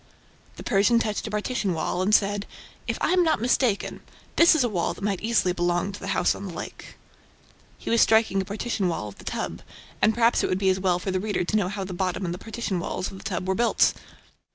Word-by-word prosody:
The - - -9
Persian 210 +3 +3
touched 215 -1 -1
a - - -4
partition 210 -3 -1
wall 160 +3 -1
and 190 - +1
said: 205 0 +1 0.4
"If - - -1
I - - +2
am 365 0 +4
not 320 -8 +2
mistaken, 240 -2 0 0.3
this 335 -1 +6
is 300 - +3
a - - +2
wall 180 -7 -1
that - - -11
might 200 -2 -1
easily 220 -5 +2
belong 175 +2 0
to 200 - -9
the 195 - -7
house - - +3
on 200 - -7
the 180 - -7
lake." - - -8 0.8
He - - -5
was 230 - +4
striking 220 -3 +4
a - - -5
partition 205 -1 -2
wall 135 -12 -3
of 100 - -15
the - - -12
"tub," - - -4 0.4
and 220 - +4
perhaps 235 0 +3
it - - 0
would 185 - +1
be 190 0 +2
as 185 - -1
well 185 -2 +2
for 190 +2 -3
the 185 - 0
reader 205 -1 -1
to 195 - -2
know 200 -4 +1
how 200 0 -4
the 190 -1 -6
bottom 185 +1 -2
and 170 - -2
the 180 - -7
partition 225 -4 -3
walls 180 - -3
of 190 - -10
the - - -13
tub 185 -2 -3
were 190 - +2
built. 235 +4 +3
200 Hz, 245 wpm, -25 LUFS, 185-220 Hz, 0.8 s, this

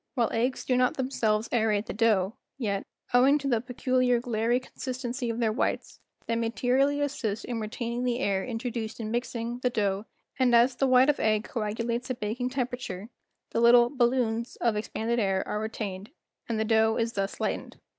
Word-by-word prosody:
"While 235 -3 +1
eggs 245 +3 0
do 255 - +2
not 250 0 +2
themselves 230 -5 0
aerate 220 -3 +1
the - - -5
dough, 210 -2 +2 0.2
yet, 200 -6 -2 0.3
owing 265 +4 +6
to 280 -1 -4
the 235 -4 +2
peculiar 250 0 +1
glairy 235 0 0
consistency 255 -1 -4
of 230 - -2
their 225 -2 +2
whites, 220 - -2 0.3
they 230 - -1
materially 250 +5 +1
assist 230 -7 -2
in 240 -2 -3
retaining 235 +2 -3
the 245 -1 0
air 200 -6 0
introduced 230 -2 -4
in 220 -1 -4
mixing 240 0 -3
the 250 - +1
dough, 205 -3 -1 0.3
and 250 -2 +4
as 240 +2 +5
the 270 - +1
white 255 +2 +5
of 290 - -9
egg 215 -1 +2
coagulates 230 +1 -3
at 255 - -3
baking 230 +4 -2
temperature, 245 -6 -4 0.4
the 230 - 0
little 240 0 +6
'balloons' 240 -3 +1
of 235 - +1
ex¬ 210 +1 -4
panded 235 +2 -1
air 195 -3 0
are 210 - -2
retained 210 -2 -5 0.4
and 225 -2 -1
the 220 - +1
dough 220 0 +3
is 230 0 -1
thus 195 -1 -3
lightened." - - -3
235 Hz, 185 wpm, -28 LUFS, 220-250 Hz, 0.4 s, owing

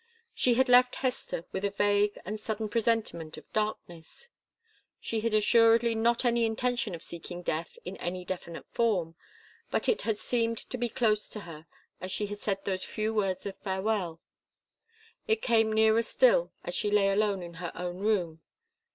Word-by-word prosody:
She 250 - +2
had 260 +2 +3
left 250 0 +6
Hester 250 -9 -2
with 190 - -4
a 200 - +2
vague 205 +1 +2
and 210 +2 -4
sudden 215 0 -3
presentiment 220 -9 -1
of - - -14
darkness. 210 - -4 0.7
She 225 - -2
had 220 0 0
assuredly 230 +2 +5
not 235 +2 +1
any 235 -1 +3
intention 230 -2 0
of 165 - -7
seeking 175 +1 -8
death 160 0 -3
in 185 +2 -6
any 180 +1 -4
definite 175 -2 -6
form, 195 -9 +1 0.6
but - - -1
it 460 - +2
had 220 -2 -1
seemed 230 0 0
to 255 - -3
be 240 0 0
close 215 -3 +1
to 210 - -7
her 165 -3 -11 0.3
as 185 - -5
she 210 - -1
had 205 0 -6
said 195 -2 -2
those 190 -1 -2
few 215 0 -2
words 195 -4 0
of 195 -1 -4
farewell. 190 -3 -1 1.1
It 445 0 +1
came 225 -2 +3
nearer 220 +1 +4
still - - +3
as - - -5
she 210 - -1
lay 205 -1 +3
alone 200 -2 +1
in 170 0 -8
her 175 - -4
own 180 +1 -4
room. 180 -6 0
210 Hz, 175 wpm, -29 LUFS, 185-230 Hz, 1.1 s, left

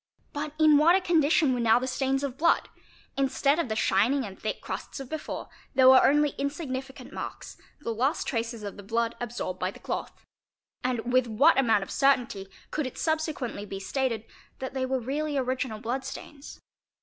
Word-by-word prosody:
But 295 0 -4
in 310 -2 +6
what 335 +4 +6
a - - +4
condition 320 -5 +3
were 250 - -1
now 230 -1 +5
the 250 - -1
stains 270 +1 0
of 270 -3 -3
blood? 335 +4 +2 0.5
Instead 275 +2 +2
of 300 - -1
the 220 - -1
shining 230 +7 +2
and 195 -2 -9
thick 215 - -3
crusts - - -6
of 270 -2 -8
before, 315 -1 -5 0.3
there 260 0 +6
were 260 0 +8
only 295 +1 +4
insignificant 270 -2 -4
marks, - - -7 0.3
the 230 - -2
last 265 +8 0
traces 230 -2 -3
of 200 0 -6
the - - -8
blood 230 +3 -1
absorbed 235 -6 -4
by 185 - 0
the - - -10
cloth. - - -5 0.6
And 245 -1 -1
with 255 -1 +4
what 270 +7 +4
amount 225 -6 +3
of - - -9
certainty 250 -8 +2 0.2
could 305 -3 -1
it 255 - -9
subsequently 315 -9 -2
be 195 -1 -6
stated 230 +2 -2 0.3
that 260 0 -5
they 260 -1 -1
were 260 0 0
really 290 +4 -2
original 255 -4 -2
blood 245 +4 -3
stains? 285 +2 -9
260 Hz, 185 wpm, -27 LUFS, 230-285 Hz, 0.6 s, were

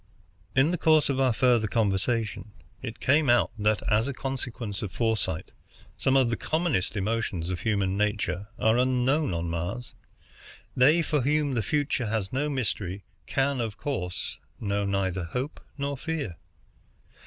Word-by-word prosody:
In 135 +5 +4
the 180 - -1
course 155 -2 +4
of 135 -1 0
our 130 -2 +4
further 120 -2 +3
conversation 110 +1 0 0.3
it 120 -1 -6
came 145 +1 +3
out 120 0 +4
that, 105 -2 +2
as 110 +3 +3
a 140 - -2
consequence 125 -6 -4
of 105 - -4
foresight, 110 -8 -1 0.4
some 135 0 +2
of 125 -3 +3
the - - +1
commonest 155 - 0
emotions 100 -4 -1
of 90 - -3
human 100 -3 0
nature 105 -2 0
are 110 +2 +3
unknown 130 +2 +2
on 85 0 -2
Mars. 90 +9 -4 0.8
They 150 +7 +5
for 150 -2 +1
whom 145 +1 +1
the 120 - +1
future 140 +1 0
has 105 -1 -2
no 145 +3 0
mystery 100 -8 -2 0.2
can, 135 -1 +1
of 110 -3 -3
course, 110 -8 -3 0.2
know 100 -1 -1
neither 95 -2 0
hope 125 - -4 0.2
nor 140 0 -2
fear. 140 - -4
115 Hz, 155 wpm, -27 LUFS, 100-135 Hz, 0.8 s, They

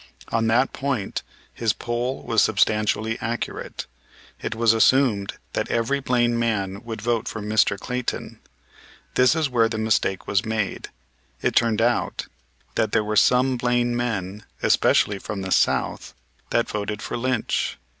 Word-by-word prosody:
On 115 0 +1
that 120 +4 +2
point 130 -7 -2 0.3
his 115 -2 0
poll 120 +2 -3
was 115 -2 +2
substantially 110 +1 +1
accurate. 115 +1 -4 0.6
It - - -3
was 115 0 +4
assumed 115 -3 +3 0.2
that - - -2
every 120 +4 +1
Blaine 120 -3 +1
man 100 -3 -1
would 115 -3 -6
vote 115 -1 0
for 110 - -4
Mr. 105 -1 +2
Clayton. 125 +4 -4 0.7
This 130 +4 +4
is 160 -2 +1
where 115 -3 +2
the 110 - -3
mistake 105 -3 0
was 100 0 +1
made. 110 -3 -2 0.5
It - - +1
turned 115 -2 +3
out 120 0 0 0.5
that - - 0
there - - +3
were 105 0 -2
some 125 +4 +4
Blaine 120 0 +1
men, 105 -4 -3 0.2
especially 105 -1 +3
from 100 0 -5
the 95 - -5
South, - - +1 0.3
that 115 - +1
voted 105 0 -4
for - - -4
Lynch. 125 -1 -1
115 Hz, 145 wpm, -23 LUFS, 105-120 Hz, 0.7 s, was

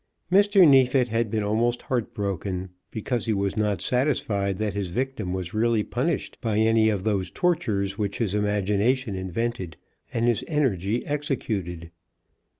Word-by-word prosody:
Mr. 200 -1 +6
Neefit 130 -2 +4
had 115 0 0
been 110 0 -1
almost 115 +4 0
heart 120 -4 -2
broken, 95 -2 -3 0.2
because 115 +1 -3
he 110 - +2
was 100 -1 -1
not 105 -5 0
satisfied 110 -7 0
that 105 -1 -1
his 100 -2 -2
victim 115 -1 -3
was 90 -2 -4
really 110 0 +2
punished 135 +9 -2
by 110 -4 0
any 110 0 +4
of 100 -3 -1
those 100 -3 0
tortures 105 - 0
which 100 -1 -2
his 110 -5 -1
imagination 105 +4 +1
invented, 95 -2 -3 0.3
and 115 +1 0
his 120 -4 +1
energy 120 - 0
executed. 100 - -3
110 Hz, 150 wpm, -25 LUFS, 100-125 Hz, 0.3 s, Mr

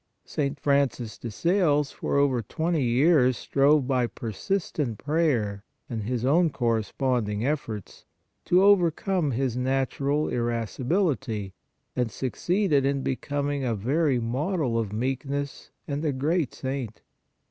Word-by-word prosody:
St. 140 -1 -2
Francis 140 -6 +1
de 120 - -5
Sales 150 - +2
for - - -2
over 135 -4 +3
twenty 160 +8 -1
years 130 +1 +4
strove 140 0 +3
by 130 -3 +2
persistent 125 - -3
prayer 130 -10 0 0.3
and 115 -2 -2
his 120 +3 -2
own 165 +5 +4
corresponding 115 -3 0
efforts, 115 - -4 0.4
to 180 +2 +4
overcome 185 -3 +3
his 130 -1 -1
natural 135 +3 0
irascibility, 120 - -1 0.4
and 125 -2 0
suc 125 +4 -3
ceeded 175 -6 +1
in 140 0 0
becoming 145 +1 -2
a 120 -3 0
very 135 +5 +1
model 130 +1 -1
of 110 -3 -2
meekness 135 +5 -3 0.2
and 145 +1 -3
a 155 - +1
great 145 +2 0
saint. 130 -5 -4
135 Hz, 125 wpm, -26 LUFS, 120-150 Hz, 0.4 s, years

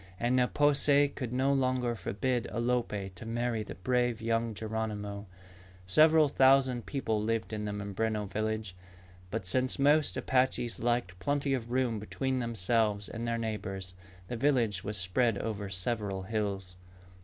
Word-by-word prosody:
And 120 +2 +1
Ne 125 -1 +4
po 145 +2 +3
se 145 0 +4
could 130 -4 -5
no 130 +2 +2
longer 130 -2 +1
forbid 120 +2 -2
Alope 115 -5 -1
to 90 - -11
marry 115 0 -1
the - - -7
brave 120 +3 0
young 115 0 -1
Geronimo. 105 -2 -4 0.6
Several 155 - +5
thousand 130 -3 +3
people 110 -6 -1
lived 115 +1 -1
in 105 -1 -3
the 105 - -2
Mimbreno 105 +1 -2
village. 110 -1 -3 0.5
But 105 0 -3
since 130 +7 +1
most 145 +2 +3
Apaches 125 -3 +1
liked 115 -7 -1
plenty 145 +1 0
of 120 -3 -2
room 125 -3 0
between 130 +5 -2
themselves 110 -2 0
and 115 +1 -4
their 115 0 0
neighbors, 95 -4 -4 0.3
the 120 - -4
village 115 -7 +1
was 105 +1 -4
spread 100 +4 +1
over 105 -2 -3
several 100 0 -2
hills. 100 -3 -3
115 Hz, 150 wpm, -31 LUFS, 105-125 Hz, 0.6 s, Several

